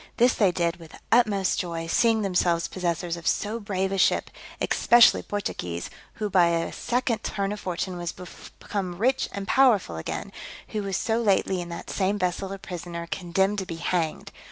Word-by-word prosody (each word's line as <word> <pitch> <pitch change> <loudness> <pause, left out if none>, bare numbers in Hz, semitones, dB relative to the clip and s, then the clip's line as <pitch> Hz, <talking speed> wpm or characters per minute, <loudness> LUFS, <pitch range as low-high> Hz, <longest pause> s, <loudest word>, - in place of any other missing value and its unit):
This 245 +1 +5
they 200 -4 +3
did 170 -1 0
with 165 -2 -14
the - - -12
utmost 210 -5 +3
joy, 170 -2 -3
seeing 220 +5 +2
themselves 175 -3 +1
possessors 175 -1 -2
of 170 - -7
so 220 +2 0
brave 195 -2 -2
a 195 - -1
ship; - - +2 0.3
especially 240 0 +5
Portugues, 90 - -4 0.2
who 215 - -2
by 180 -3 +4
a 170 0 0
second 245 -2 -1
turn 200 -1 -2
of 210 - -4
fortune 180 0 -3
was 175 -1 -3
become 180 0 -7
rich 255 +6 +1
and 200 -1 -5
powerful 230 - +3
again, 80 - -5 0.4
who 215 - -2
was 195 -2 -2
so 225 +1 0
lately 190 -3 +2
in 175 - -7
that 170 - -7
same 195 +1 0
vessel 185 0 -2
a 195 - -4
prisoner, 175 -2 -6
condemned 190 +3 0
to 190 - -4
be 165 - -5
hanged. 165 -1 -2
190 Hz, 180 wpm, -26 LUFS, 170-210 Hz, 0.4 s, This